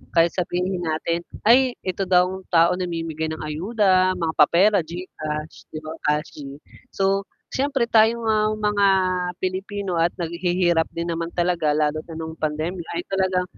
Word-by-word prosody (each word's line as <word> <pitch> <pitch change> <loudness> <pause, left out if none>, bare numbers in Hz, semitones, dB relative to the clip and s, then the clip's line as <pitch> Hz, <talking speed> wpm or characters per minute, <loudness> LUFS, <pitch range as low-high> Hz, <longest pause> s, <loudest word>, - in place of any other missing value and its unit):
kahit 165 0 +4
sabihin 180 +1 -2
natin 165 0 -1 0.2
ay 250 +3 +5
ito 185 0 -2
daw 180 -1 +5
ang 190 0 -7
taong 170 +2 +4
namimigay 165 -3 -3
ng 160 - -6
ayuda, 185 +3 +2
mga 165 -2 -2
papera, 190 +7 +5
Gcash, 155 -3 -6 0.4
cash, 150 +2 0 0.6
so 195 0 +1 0.3
siyempre 270 -2 0
tayong 230 0 +3 0.4
mga 205 -1 +2 0.6
Pilipino 190 -1 -2
at 170 +1 +1
naghihirap 175 0 0
din 170 0 -2
naman 165 0 -2
talaga 170 -4 +1
lalo 155 0 +1
na 165 - -8
nung 160 0 -5
pandemya 160 +3 -3
ay 350 - -2
talagang, 190 -1 +1
175 Hz, 135 wpm, -23 LUFS, 165-195 Hz, 0.6 s, ay